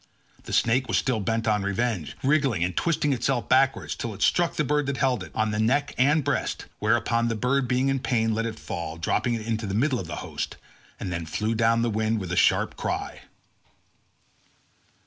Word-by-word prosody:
The - - -7
snake 125 +3 +2
was - - +1
still 125 -4 0
bent 115 +3 -1
on 105 -1 +2
revenge, 100 -3 -2
wriggling 135 - +2
and 90 0 -2
twisting 150 -4 +1
itself 125 0 -1
backwards 135 +1 +2
till 115 -3 -5
it - - -2
struck 175 -1 +2
the 150 - +1
bird 150 0 0
that 140 -2 -2
held 125 -5 +1
it, - - -10
on 110 0 +1
the 105 - -2
neck 140 +6 +1
and 145 +4 +3
breast; - - -1
whereon 115 +2 +1
the 115 - -1
bird 125 +4 +1
being 130 +2 +1
in 135 0 +1
pain, 115 -4 +1
let 115 +1 -1
it 110 -1 -6
fall, 85 -6 -5
dropping 120 +8 0
it 110 -1 -5
into 110 -1 -2
the 95 - -2
middle 130 +2 +1
of 90 - -6
the 85 - -5
host, - - -5 0.4
and 90 - -4
then 85 -2 -4
flew 105 +7 -1
down 115 +1 +2
the 120 - +1
wind 110 +1 0
with 90 -3 -5
a - - 0
sharp - - +3
cry. - - -3
115 Hz, 205 wpm, -26 LUFS, 105-130 Hz, 0.4 s, and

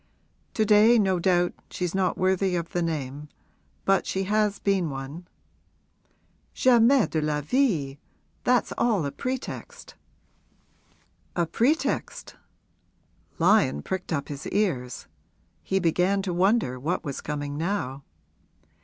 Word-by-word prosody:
'To 220 - +2
day, 215 +3 +6
no 190 -4 +2
doubt, 175 -1 +2 0.2
she's 180 -2 -3
not 190 -2 0
worthy 185 0 +1
of 170 -1 -3
the 175 - -2
name; 150 -3 -4 0.6
but 195 0 +2
she 190 - -1
has 210 +1 +1
been 195 -5 0
one.' 140 +6 -7 1.3
'Jamais 250 0 +5
de 160 - -2
la 150 -1 0
vie! 155 - 0 0.4
That's 250 -1 +2
all 215 -10 +2
a 140 - -3
pretext.' 255 - -6 1.4
'A 175 - +1
pretext?' 245 - -1 1.0
Lyon 165 - +3
pricked 190 -1 -4
up 140 -3 -2
his 145 -1 -6
ears 145 - -1 0.6
he 190 - -1
began 185 +3 +1
to 185 -2 -2
wonder 180 - +1
what 160 +8 -2
was 140 -4 -5
coming 145 -1 -4
now. 150 -5 -3
180 Hz, 120 wpm, -26 LUFS, 150-205 Hz, 1.4 s, day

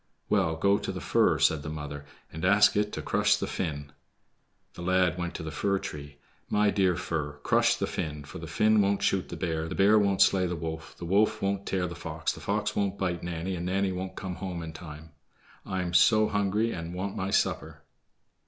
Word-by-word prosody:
"Well, 95 -6 +2
go 100 +5 +2
to - - -4
the - - -5
fir," - - +2
said 80 - +3
his 75 - -5
mother, 75 -1 -6 0.3
"and 80 - -7
ask 100 +2 +5
it 105 0 +1
to - - -4
crush - - +3
the - - -2
Finn." 75 -5 -4 0.8
The - - -10
lad 90 -1 +2
went 85 -1 -4
to - - -5
the 80 - -5
fir 100 +6 0
tree. 75 -7 -7 0.3
"My 105 0 +3
dear 95 -3 +2
fir, 80 -4 -3
crush 120 0 +3
the 100 - -1
Finn, 75 -6 -4
for 70 +2 -9
the 80 - -7
Finn 110 +6 +3
won't 100 0 +1
shoot 95 -1 +1
the - - -6
bear, 80 -3 -2
the - - -5
bear 105 +2 +5
won't 100 -2 +4
slay 95 -2 +2
the 90 - -2
wolf, 80 0 -6
the 85 - -7
wolf 105 +4 +2
won't 100 -1 -2
tear 95 -2 0
the 85 - -5
fox, 80 -1 -3
the - - -11
fox - - -1
won't 100 -1 0
bite 90 -3 -2
Nanny, 85 +2 -3
and 85 +1 -4
Nanny 95 +1 +1
won't 95 +1 -5
come 95 -2 -5
home 90 -3 -5
in 80 -1 -7
time. 80 -1 -10 0.6
I 95 -1 -1
am 85 -1 -4
so 110 +4 +5
hungry 105 +3 +1
and 85 -1 -5
want 95 +2 -3
my 95 - -2
supper." 80 -6 -1
90 Hz, 220 wpm, -28 LUFS, 80-100 Hz, 0.8 s, ask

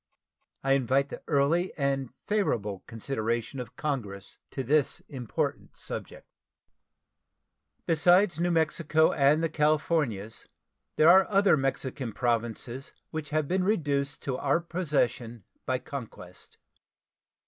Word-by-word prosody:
I 135 - +1
invite 135 +1 +2
the - - -8
early 160 +6 +2
and 135 -3 0 0.2
favorable 110 - -1
consideration 115 +1 -3
of 125 -2 -7
Congress 105 -10 -4
to 135 - -4
this 145 +2 +1
important 125 -6 -4
subject. - - -7 1.6
Besides 175 +2 +4
New 175 +1 +1
Mexico 160 -1 +2
and 145 +3 +3
the - - +3
Californias, 150 - 0 0.5
there 155 - +5
are 190 +3 +7
other 200 -3 +4
Mexican 135 -3 -2
Provinces 120 +3 -2 0.2
which 155 -2 -5
have 155 0 0
been 185 +3 +1
reduced 145 -8 0
to 130 -2 -2
our 145 +4 +1
possession 140 - -1 0.2
by 130 - +1
conquest. 115 -10 -9
140 Hz, 115 wpm, -28 LUFS, 120-160 Hz, 1.6 s, are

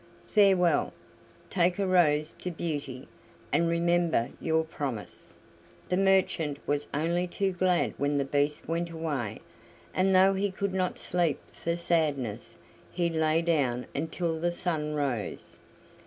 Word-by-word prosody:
Farewell. 190 -6 +3 0.6
Take 180 -1 +2
a 200 - 0
rose 155 -4 +3
to 180 - -3
Beauty, 145 -6 -4 0.5
and 165 +3 +3
remember 170 -6 +1
your 160 0 +2
promise!" 140 -9 -5 0.6
The 180 - +2
merchant 185 -6 +2
was 145 0 -1
only 170 +4 0
too 195 +2 -1
glad 180 -1 +1
when 145 +1 +1
the 140 - +1
Beast 145 +2 0
went 170 +2 -1
away, 155 -9 -3 0.5
and 190 +1 +3
though 190 +1 +6
he 200 +1 0
could 195 0 -3
not 185 -1 -1
sleep 175 -4 0
for 170 0 -2
sadness, 145 - -1 0.3
he 170 -1 0
lay 160 0 +2
down 135 -7 +1
until 160 +2 -2
the 175 +1 +1
sun 155 -4 -2
rose. 135 -8 -3
165 Hz, 135 wpm, -28 LUFS, 145-180 Hz, 0.6 s, though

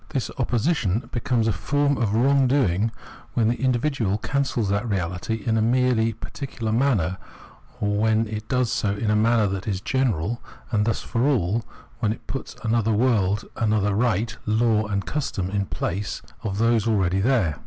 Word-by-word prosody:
This 135 -5 -2
opposition 120 - 0
becomes 120 -1 0
a - - +3
form 145 - +1
of 110 -3 +1
wrongdoing 125 -5 +3 0.5
when 115 -2 +3
the 120 - -2
individual 125 -5 +1
cancels 130 -3 -1
that 100 +4 0
reality 95 +3 -2
in 115 -1 +2
a - - +2
merely 120 -1 +2
par 110 - -9
ticular 115 -5 -3
manner, 105 -9 +1 0.6
or 105 0 0
when 110 +1 +2
it 105 0 -5
does 125 -3 +1
so 100 -1 0
in 105 +1 -1
a - - +3
manner 110 +1 +3
that 95 0 -3
is 95 -3 -1
general 120 - 0 0.3
and 105 -3 +2
thus 115 - 0
for 120 +4 0
all, 115 -5 +1 0.4
when 110 -3 +1
it 110 - -7
puts 135 - -6
another 115 -1 +1
world, 105 -3 +2
another 105 -2 +1
right, 110 0 +1
law, 110 0 +2
and 100 -2 -2
custom 120 -11 -2
in 100 -1 -1
place 100 +3 -3 0.2
of 100 -5 -3
those 115 -1 +2
aheady 95 -4 +2
there. 100 - +1
110 Hz, 170 wpm, -24 LUFS, 100-120 Hz, 0.6 s, a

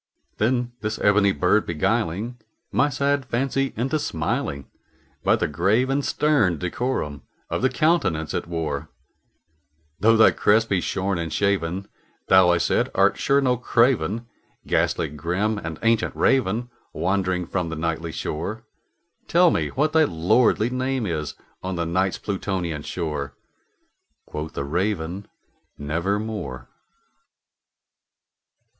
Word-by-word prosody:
Then 120 +2 +1
this 110 0 -2
ebony 100 -1 +4
bird 95 +3 +2
beguiling 105 +6 -1 0.3
my 145 - +3
sad 140 0 0
fancy 135 +2 -1
into 135 +7 0
smiling, 70 - -2 0.6
By - - +4
the - - 0
grave 110 - +1
and 140 +1 +1
stern 135 - +2
decorum 90 - -2 0.3
of - - -1
the 130 - +3
countenance 130 - +1
it - - -2
wore, 80 -3 -3 1.1
"Though 115 +3 +5
thy 110 - +7
crest 110 +2 +2
be 95 -3 +1
shorn 95 0 -1
and 85 -1 -3
shaven, 95 -2 0 0.4
thou," 95 -2 +7
I 85 - +4
said, - - +1
"art - - +3
sure 140 +1 +3
no 125 -2 +2
craven, 115 -3 +1 0.4
Ghastly - - +1
grim 90 +8 -1
and 80 -4 -6
ancient 115 -1 +2
Raven 120 -2 +1 0.2
wandering 95 -2 0
from 90 -1 -2
the 80 - -4
Nightly 80 +1 -2
shore 100 +10 -4 0.6
Tell 175 0 +5
me - - 0
what 150 +3 0
thy 160 -1 +5
lordly 110 - +2
name 130 -1 -1
is 80 -5 -3 0.3
on 95 0 -3
the 85 -1 -1
Night's 95 +3 0
Plutonian 95 -6 -3
shore!" 75 -4 -4 0.9
Quoth 75 +1 -6
the - - -3
Raven, 90 +4 -2 0.5
"Nevermore." 100 +9 -3
100 Hz, 125 wpm, -23 LUFS, 85-120 Hz, 1.1 s, thy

